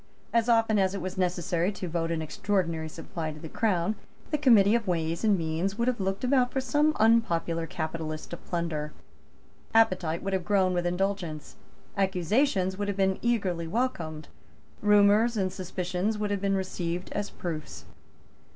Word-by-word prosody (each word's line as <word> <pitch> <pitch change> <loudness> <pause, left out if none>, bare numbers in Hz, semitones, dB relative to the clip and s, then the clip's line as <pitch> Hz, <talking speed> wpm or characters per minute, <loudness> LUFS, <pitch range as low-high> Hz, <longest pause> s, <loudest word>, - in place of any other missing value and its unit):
As 235 0 +2
often 225 -2 +4
as 190 0 +1
it - - -3
was 185 +1 -5
necessary 175 0 0
to 185 - -5
vote 165 0 -1
an 165 -1 -1
extraordinary 165 -2 -1
supply 160 0 -5
to 155 - -10
the 160 - -7
Crown, 185 +1 0 0.4
the 300 - +2
Committee 225 -7 +6
of 230 -3 +1
Ways 165 0 -1
and 210 -3 +4
Means 165 +4 -2
would 235 +1 0
have 250 -2 0
looked 195 +2 -2
about 255 -1 +3
for 270 - -1
some 295 +5 +2
unpopular 170 -7 +2
capitalist 160 -1 -5
to 170 - -4
plunder. 160 -4 -3 0.8
Appetite 185 -7 +3
would 195 0 -2
have 190 -1 0
grown 190 -1 +2
with 175 0 0
indulgence. 180 -4 -2 0.4
Accusations 190 - +1
would 205 - -1
have 200 -1 -2
been 190 -1 +1
eagerly 190 -8 0
welcomed. 165 - -2 0.5
Rumours 210 +3 +4
and 185 -2 0
suspicions 185 +2 -2
would 210 -1 -2
have 200 -2 -1
been 195 -1 +1
received 180 -2 -3
as 205 - -2
proofs. 160 -3 -6
190 Hz, 165 wpm, -28 LUFS, 170-210 Hz, 0.8 s, Committee